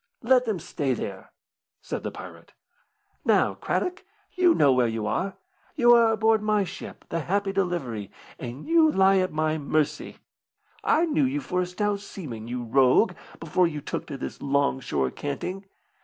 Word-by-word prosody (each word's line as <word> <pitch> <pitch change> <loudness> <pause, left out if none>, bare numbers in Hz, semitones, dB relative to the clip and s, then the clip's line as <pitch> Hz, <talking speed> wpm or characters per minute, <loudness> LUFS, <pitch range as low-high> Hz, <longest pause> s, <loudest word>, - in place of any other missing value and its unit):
"Let 250 +1 +4
them 220 -4 -1
stay 140 -5 -2
there," - - -7 0.5
said - - -5
the - - -3
pirate. - - -11 0.7
"Now, - - +3
Craddock, 365 +1 -2 0.3
you 360 -3 +4
know 140 -2 +5
where 125 -2 +3
you 110 -1 -3
are. 195 - -1 0.4
You 240 -5 +6
are 230 -1 +5
aboard 220 0 +3
my 210 -1 +2
ship, 190 0 -9
the 165 - -1
Happy 195 +4 -1
Delivery, 165 - -2 0.3
and 125 +4 -7
you 325 -1 +4
lie 195 -2 +4
at 185 0 0
my 155 0 0
mercy. 150 +1 -1 0.7
I 330 - +3
knew 305 -3 +2
you 275 +3 -1
for 180 -9 -1
a 180 - -2
stout 200 +3 -1
seaman, 135 - -8
you 120 0 -4
rogue, 130 - +4 0.3
before 165 +2 +2
you 150 -3 -4
took 145 - -5
to 140 - -6
this - - -7
long 140 -1 +1
shore 70 - -1
canting. 180 +7 -5
180 Hz, 170 wpm, -26 LUFS, 140-220 Hz, 0.7 s, You